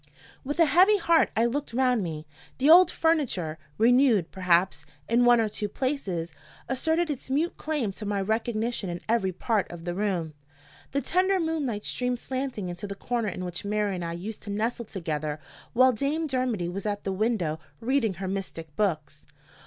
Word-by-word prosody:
With 290 +3 -3
a 330 - +7
heavy 375 +7 +5
heart 335 -3 +3
I 225 - +4
looked 275 +1 -2
round 250 -2 +2
me. 160 -4 -5 0.3
The 280 +4 +5
old 360 +2 +9
furniture 240 - 0 0.2
renewed, 235 - +4
perhaps, 180 -4 +1 0.2
in 240 +1 +3
one 240 -1 +6
or 225 - +2
two 210 0 -4
places 195 - -2 0.3
asserted 320 +5 +1
its 265 -2 -6
mute 305 +6 0
claim 295 -9 -2
to 210 +2 -7
my 205 -1 0
recognition 220 0 -1
in 175 0 -4
every 220 -4 +1
part 210 +3 -1
of 170 -1 -9
the 175 - -2
room. 180 -5 -1 0.6
The 280 - -1
tender 375 +4 +2
moonlight 295 -11 -2
streamed 250 0 -1
slanting 260 -6 -4
into 175 +3 -5
the 200 - -6
corner 235 +1 -2
in 185 - -5
which 175 -1 -5
Mary 205 0 0
and 180 -2 -4
I 170 0 -3
used 200 +6 -6
to 205 - -9
nestle 225 +3 -2
together 155 -6 -3 0.3
while 255 +2 +6
Dame 280 +7 -1
Dermody 255 - -1
was 195 +4 -4
at 205 -1 -2
the 195 - -2
window 190 -7 0 0.2
reading 230 -4 +1
her 190 +2 -5
mystic 175 -5 -5
books. 155 -8 -2
220 Hz, 180 wpm, -27 LUFS, 185-260 Hz, 0.6 s, old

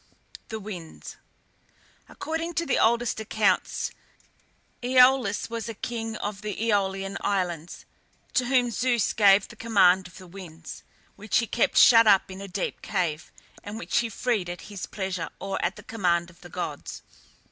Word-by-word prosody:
THE 220 - -4
WINDS. 185 -6 -9 0.9
According 325 +1 -4
to 335 - 0
the 275 - +1
oldest 235 0 +2
accounts, 215 -1 0 0.9
Æolus 250 -3 +4
was 230 -1 -5
a 225 - -6
king 225 0 -4
of 205 -1 -5
the 210 -2 -4
Æolian 195 -3 -1
Islands, 175 -5 -2 0.5
to 250 - +1
whom 245 -2 +2
Zeus 240 0 +1
gave 200 -2 +5
the - - -13
command 190 -5 +3
of 175 - -15
the 185 - -11
winds, 170 -3 -10 0.4
which 215 +1 0
he 230 - +2
kept 230 - 0
shut 230 -2 +8
up 195 -2 +4
in 190 +1 -8
a 200 - -7
deep 190 +1 -4
cave, 165 -6 -2 0.3
and 205 +2 -7
which 230 - 0
he 235 - -1
freed 215 -4 -1
at 175 - -6
his 200 -3 -6
pleasure, 190 -4 -4
or 195 0 -3
at 180 +2 0
the - - -12
command 175 -5 0
of 170 - -23
the - - -12
gods. - - -6
205 Hz, 160 wpm, -26 LUFS, 185-230 Hz, 0.9 s, shut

